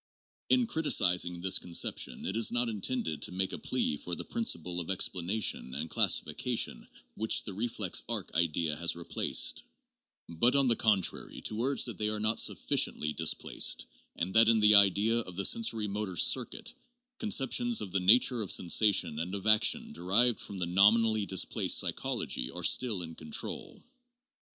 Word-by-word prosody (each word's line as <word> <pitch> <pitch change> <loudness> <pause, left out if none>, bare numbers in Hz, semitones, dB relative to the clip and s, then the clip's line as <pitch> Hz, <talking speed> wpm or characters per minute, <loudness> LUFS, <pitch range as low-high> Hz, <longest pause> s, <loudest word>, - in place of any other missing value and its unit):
In 255 -2 +3
criticising 90 - +1
this 95 +1 +2
conception 85 -1 -1
it 95 - -4
is 115 0 +3
not 120 0 -1
intended 105 - -4
to - - -1
make 95 +1 -2
a - - -6
plea 75 - -2
for 90 +4 -6
the - - -5
principles 90 - -3
of 85 - -8
explanation 95 -7 -1
and 75 +3 -6
classification - - +1 0.3
which 110 +1 0
the 100 - -7
re 110 +6 -3
flex 105 -6 -1
arc 110 -5 -2
idea 80 -2 -1
has 85 0 0
replaced; 85 0 0 0.7
but, 120 +11 0
on 140 -1 +2
the 120 - +2
contrary, 105 -6 -1
to 110 +1 -3
urge 135 +3 +1
that 115 -6 -5
they 105 0 -1
are 105 0 -4
not 110 +2 0
sufficiently 75 0 -1
displaced, 80 0 0 0.3
and 90 +3 -4
that 115 0 +5
in 115 -1 +3
the 105 0 +4
idea 100 +3 +4
of 90 -6 -8
the 100 - -3
sensori 115 - +1
motor 100 -3 -5
circuit, - - +1 0.5
conceptions 225 - +1
of 95 - -5
the 95 - -1
nature 115 +5 +3
of 100 - -3
sensation 90 -4 +3
and 90 +4 -5
of 100 - -7
action 110 -1 +2
derived 105 +8 +1
from 100 - -5
the 90 - -3
nominally 105 +4 +2
displaced 95 - +1
psychology - - -2
are - - -8
still 110 -8 +1
in 80 -1 -9
control. 80 -1 -5
100 Hz, 165 wpm, -29 LUFS, 90-115 Hz, 0.7 s, that